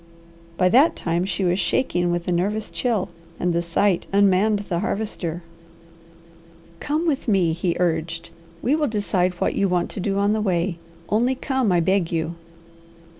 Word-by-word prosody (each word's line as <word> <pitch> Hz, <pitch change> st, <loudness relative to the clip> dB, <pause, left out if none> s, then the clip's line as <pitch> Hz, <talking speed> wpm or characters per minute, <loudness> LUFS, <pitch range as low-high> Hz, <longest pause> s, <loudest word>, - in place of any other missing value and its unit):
By 180 Hz, -, +4 dB
that 270 Hz, -, +5 dB
time 170 Hz, +1 st, -1 dB
she 195 Hz, 0 st, -2 dB
was 180 Hz, +1 st, +1 dB
shaking 175 Hz, -1 st, +1 dB
with 175 Hz, 0 st, -2 dB
a -, -, +1 dB
nervous 205 Hz, +5 st, -1 dB
chill, 230 Hz, -7 st, -1 dB, 0.3 s
and 175 Hz, -1 st, 0 dB
the 170 Hz, -, +1 dB
sight 175 Hz, +2 st, +1 dB
unmanned 200 Hz, +1 st, +3 dB
the 170 Hz, -2 st, -1 dB
Harvester. 175 Hz, -5 st, -3 dB, 1.4 s
"Come 305 Hz, +3 st, -1 dB
with 295 Hz, -6 st, -1 dB
me!" 185 Hz, -6 st, +3 dB
he 170 Hz, +1 st, -1 dB
urged. 165 Hz, -1 st, -1 dB, 0.3 s
"We 270 Hz, +5 st, +3 dB
will 305 Hz, -2 st, +1 dB
decide 195 Hz, -5 st, 0 dB
what -, -, 0 dB
you 195 Hz, -, +1 dB
want 180 Hz, -1 st, 0 dB
to -, -, -6 dB
do 195 Hz, +1 st, -1 dB
on 200 Hz, +1 st, +2 dB
the 215 Hz, -, 0 dB
way. 175 Hz, -3 st, 0 dB, 0.3 s
Only 240 Hz, +5 st, +1 dB
come, 260 Hz, -5 st, 0 dB
I 175 Hz, -1 st, +3 dB
beg 190 Hz, 0 st, +1 dB
you." 165 Hz, 0 st, -1 dB
185 Hz, 170 wpm, -23 LUFS, 175-215 Hz, 1.4 s, that